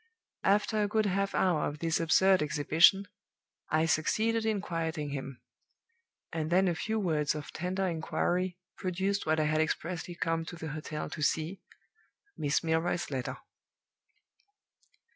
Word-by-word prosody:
After 210 Hz, +2 st, +2 dB
a 205 Hz, -, +2 dB
good 215 Hz, +1 st, +1 dB
half 195 Hz, 0 st, 0 dB
hour 175 Hz, -5 st, +2 dB
of 145 Hz, -, -5 dB
this 165 Hz, +1 st, 0 dB
absurd 185 Hz, +3 st, +4 dB
exhibition, 155 Hz, +6 st, +4 dB, 0.6 s
I 155 Hz, +1 st, +2 dB
succeeded 220 Hz, +8 st, +1 dB
in 215 Hz, -2 st, +1 dB
quieting 165 Hz, -5 st, -3 dB
him; 135 Hz, -2 st, -6 dB, 0.9 s
and 160 Hz, -1 st, -2 dB
then 185 Hz, +2 st, +4 dB
a 175 Hz, -, +2 dB
few 220 Hz, +7 st, -2 dB
words 155 Hz, -6 st, +1 dB
of 150 Hz, -1 st, -6 dB
tender 185 Hz, +3 st, -2 dB
inquiry 175 Hz, +1 st, -1 dB, 0.2 s
produced 190 Hz, +2 st, -1 dB
what 155 Hz, 0 st, +2 dB
I -, -, +3 dB
had 155 Hz, +1 st, +2 dB
expressly 170 Hz, +2 st, -3 dB
come 165 Hz, -1 st, -1 dB
to 175 Hz, -, -7 dB
the 160 Hz, -2 st, -6 dB
hotel 150 Hz, 0 st, -5 dB
to -, -, -6 dB
see 160 Hz, +5 st, 0 dB, 0.7 s
Miss 145 Hz, +2 st, 0 dB
Milroy's 165 Hz, +1 st, 0 dB
letter. 130 Hz, -2 st, -3 dB
165 Hz, 140 wpm, -30 LUFS, 155-190 Hz, 0.9 s, absurd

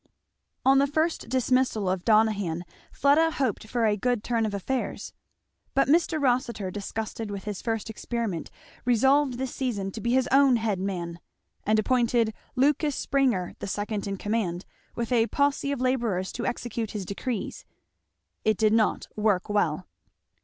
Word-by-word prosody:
On 270 Hz, +1 st, +6 dB
the 280 Hz, -, +3 dB
first 315 Hz, +4 st, -1 dB
dismissal 255 Hz, -5 st, +1 dB
of 185 Hz, -1 st, 0 dB
Donohan 205 Hz, -6 st, +2 dB, 0.3 s
Fleda 300 Hz, +4 st, +4 dB
hoped 260 Hz, -8 st, -2 dB
for 235 Hz, 0 st, 0 dB
a 210 Hz, -1 st, +3 dB
good 240 Hz, +1 st, 0 dB
turn 230 Hz, -2 st, 0 dB
of 210 Hz, -, -4 dB
affairs. 255 Hz, +7 st, -3 dB, 0.6 s
But 275 Hz, -, +4 dB
Mr. 320 Hz, +1 st, +3 dB
Rossitur, 245 Hz, -7 st, 0 dB
disgusted 215 Hz, +2 st, -4 dB
with 200 Hz, -1 st, -5 dB
his 210 Hz, -2 st, -5 dB
first 225 Hz, -2 st, -2 dB
experiment, 220 Hz, -5 st, -3 dB, 0.3 s
resolved 265 Hz, +2 st, +3 dB
this 260 Hz, 0 st, -3 dB
season 205 Hz, -7 st, -2 dB
to 220 Hz, -, -7 dB
be 235 Hz, +3 st, 0 dB
his 260 Hz, 0 st, +3 dB
own 270 Hz, -1 st, +6 dB
head 220 Hz, -4 st, 0 dB
man; 175 Hz, -3 st, -3 dB, 0.5 s
and 215 Hz, +1 st, +4 dB
appointed 235 Hz, -1 st, +2 dB, 0.2 s
Lucas 285 Hz, +2 st, +2 dB
Springer 250 Hz, -11 st, +1 dB
the -, -, -5 dB
second 205 Hz, +1 st, -3 dB
in 195 Hz, 0 st, -3 dB
command, 200 Hz, -4 st, -2 dB, 0.3 s
with 235 Hz, +1 st, -3 dB
a 230 Hz, -2 st, +3 dB
posse 280 Hz, +3 st, +1 dB
of 280 Hz, -, -2 dB
labourers 235 Hz, -8 st, 0 dB
to 240 Hz, -, -3 dB
execute 230 Hz, -2 st, -3 dB
his 205 Hz, -3 st, -4 dB
decrees. 200 Hz, +4 st, -4 dB, 0.8 s
It 215 Hz, -2 st, +2 dB
did 215 Hz, -1 st, +3 dB
not 225 Hz, -1 st, +2 dB
work 210 Hz, -4 st, +1 dB
well. 185 Hz, -4 st, +1 dB
225 Hz, 155 wpm, -27 LUFS, 205-260 Hz, 0.8 s, On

